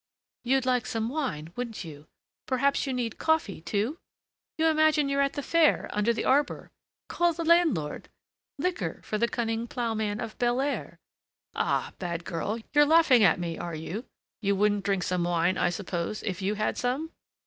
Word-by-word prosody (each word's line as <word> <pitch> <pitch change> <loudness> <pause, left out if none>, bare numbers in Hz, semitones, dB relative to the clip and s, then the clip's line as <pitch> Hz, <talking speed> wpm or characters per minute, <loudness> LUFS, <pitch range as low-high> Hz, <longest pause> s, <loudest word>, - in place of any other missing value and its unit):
"You'd 260 +1 +2
like 250 -1 +1
some 225 -2 -2
wine, 240 - -3
wouldn't 235 -5 -4
you? 155 -2 -11 0.4
Perhaps 275 +2 +1
you - - -1
need 245 -3 -3
coffee, 320 - +1
too? 215 - -2 0.6
you 320 - +2
imagine 310 -2 +3
you're 280 0 +2
at 275 0 +1
the 285 - -4
fair 330 0 +3
under 210 +3 +2
the 230 - -2
arbor! 280 +2 +1 0.4
Call 345 -1 +1
the 335 +1 -4
landlord: 320 - +2 0.5
liquor 280 - -2
for 215 - -3
the 235 - +3
cunning 230 -1 -2
ploughman 220 -4 -2
of 225 -1 -6
Belair!" 250 +4 -1 0.6
"Ah! - - -1
bad 170 -2 -4
girl, 200 +6 -2 0.2
you're 295 0 +7
laughing 295 -6 +5
at 180 -2 +5
me, 170 -1 -4
are 170 -2 -4
you? 180 +10 -5 0.4
You 200 -1 +1
wouldn't 205 0 +1
drink 195 -2 +1
some 180 -1 0
wine, 175 +1 +1
I 180 - +2
suppose, 175 +1 -3
if 195 -1 -3
you 200 +2 0
had 215 +1 -1
some?" 265 +6 -1
230 Hz, 170 wpm, -28 LUFS, 190-280 Hz, 0.6 s, you're